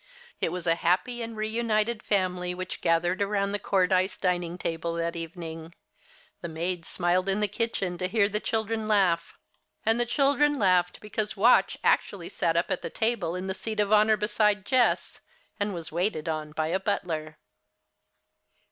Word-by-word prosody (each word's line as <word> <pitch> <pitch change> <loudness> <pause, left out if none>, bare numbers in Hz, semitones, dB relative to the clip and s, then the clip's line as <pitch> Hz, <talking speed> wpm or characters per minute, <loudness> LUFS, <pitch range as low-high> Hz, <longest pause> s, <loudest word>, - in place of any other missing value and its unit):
It - - 0
was 180 -1 -5
a 165 - +4
happy 185 +9 0
and 230 -1 -6
reunited 220 0 0
family 180 -3 0
which 185 0 -6
gathered 175 +3 +1
around 200 0 0
the 205 - -2
Cordyce 185 -1 +1
dining 175 -2 -1
table 165 -1 -3
that 170 0 -2
evening. 165 0 -7 0.7
The 170 - -5
maids 170 +1 -3
smiled 180 +2 +1
in 195 +2 +1
the 210 - +2
kitchen 195 -4 -2
to 185 - 0
hear 200 +1 +2
the 210 +1 -1
children 220 0 -2
laugh; 180 -6 +2 0.5
and 225 +2 +3
the 240 - +1
children 285 +3 +3
laughed 180 -5 +2
because 210 0 -3
Watch 235 +5 +4
actually 175 -4 +1
sat 165 -1 0
up 170 - 0
at - - -1
the - - -4
table 220 -7 -1
in 180 +1 -4
the 190 - -2
seat 215 +2 -5
of 205 0 +2
honor 215 0 +5
beside 210 -1 +1
Jess, 255 -2 +1 0.4
and 205 0 0
was 170 -4 -6
waited 170 -1 -1
upon 155 -1 -3
by 155 0 -1
a 190 - +1
butler. 155 -5 -3
190 Hz, 170 wpm, -27 LUFS, 170-215 Hz, 0.7 s, honor